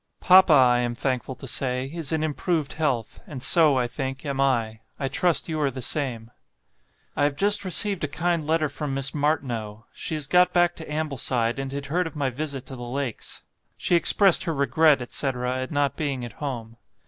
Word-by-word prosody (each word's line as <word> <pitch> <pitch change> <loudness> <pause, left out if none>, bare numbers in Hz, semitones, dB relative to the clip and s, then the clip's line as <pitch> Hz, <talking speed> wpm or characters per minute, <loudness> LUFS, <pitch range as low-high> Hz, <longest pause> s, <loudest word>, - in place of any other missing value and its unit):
Papa, 185 -1 +6
I 125 -4 +5
am 120 -1 -2
thankful 130 0 -3
to 135 - -9
say, 130 0 -1
is 165 -3 -4
in 160 -1 0
improved 155 0 -2
health, 135 -8 -2
and 130 -4 -7
so, 155 -2 +4
I 125 - +1
think, 135 +3 -5
am 140 -1 -2
I; 115 -5 0 0.2
I 135 - -1
trust 175 +5 0
you 155 -2 -3
are 145 - +2
the 130 -2 -7
same. 120 -5 -3 0.8
"I 145 - +2
have 145 -1 0
just 205 +4 +3
received 195 0 +3
a - - +1
kind 165 +1 -1
letter 160 -1 +1
from 140 -1 -4
Miss 135 0 +1
Martineau. 120 -8 -2
She 160 - -3
has 150 -2 0
got 180 +3 +3
back 175 0 +3
to 160 -2 -8
Ambleside, 135 -5 0
and 135 0 -4
had 140 +1 -5
heard 175 +5 -1
of 160 - -10
my 140 -3 -1
visit 140 0 -4
to 130 - -9
the 125 - -10
Lakes. 125 0 -4 0.3
She 175 - +1
expressed 180 +2 +4
her 165 - -2
regret, 145 0 +3
etc., 125 0 -2
at 130 - -4
not 145 -3 0
being 140 -5 -3
at 120 - -9
home. 115 -6 -6
140 Hz, 200 wpm, -24 LUFS, 130-160 Hz, 0.8 s, Papa